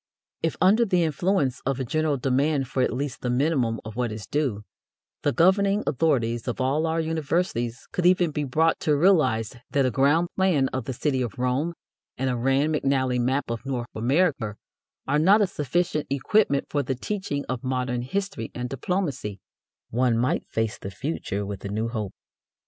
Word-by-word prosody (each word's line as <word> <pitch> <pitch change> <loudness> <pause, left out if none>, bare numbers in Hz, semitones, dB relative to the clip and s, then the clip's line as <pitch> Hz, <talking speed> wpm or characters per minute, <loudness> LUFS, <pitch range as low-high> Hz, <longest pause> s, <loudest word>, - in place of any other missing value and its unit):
If 165 - -1
under 200 +6 +5
the 180 -5 +2
influence 155 -3 0
of 135 -1 -1
a 130 - -1
general 155 +2 0
demand 135 +2 +1
for 130 - -1
at - - +2
least 135 0 -4
the 125 - -2
minimum 125 -3 +1
of 110 -1 -7
what 120 -2 -1
is 105 -2 -6
due, 125 -3 -1 0.6
the - - +2
governing 195 - +3
authorities 120 -6 +1
of 120 - -2
all 140 +5 +1
our 160 +1 0
universities 160 -6 -1
could 180 -1 +2
even 180 -3 +3
be 150 0 -2
brought 160 +5 +2
to 150 - +2
realize 145 - +3
that 140 -2 +2
a 130 - +1
ground 145 +6 +3
plan 170 -9 +2
of 130 -3 -4
the 130 - -3
city 130 +1 0
of 120 -5 -4
Rome 130 +7 0 0.4
and 130 0 0
a - - -1
Rand 135 +5 +2
McNally 130 -4 +1
map 130 +1 0
of 115 0 -4
North 125 -3 -3
America 130 - +1 0.5
are 145 +2 +2
not 195 +7 +6
a 205 - +4
sufficient 155 -1 -1
equipment 140 +2 +2
for 145 - 0
the 130 -1 -2
teaching 145 -1 -3
of 125 0 -3
modern 125 -1 -1
history 190 - -3
and 125 0 -3
diplomacy, 135 - -2 0.5
one 120 0 +2
might 125 +2 0
face 110 -1 -2
the 95 - -6
future 100 -4 -3
with 100 -1 -6
a 100 - -4
new 110 +3 -1
hope. 110 -5 -4
135 Hz, 185 wpm, -25 LUFS, 125-160 Hz, 0.6 s, not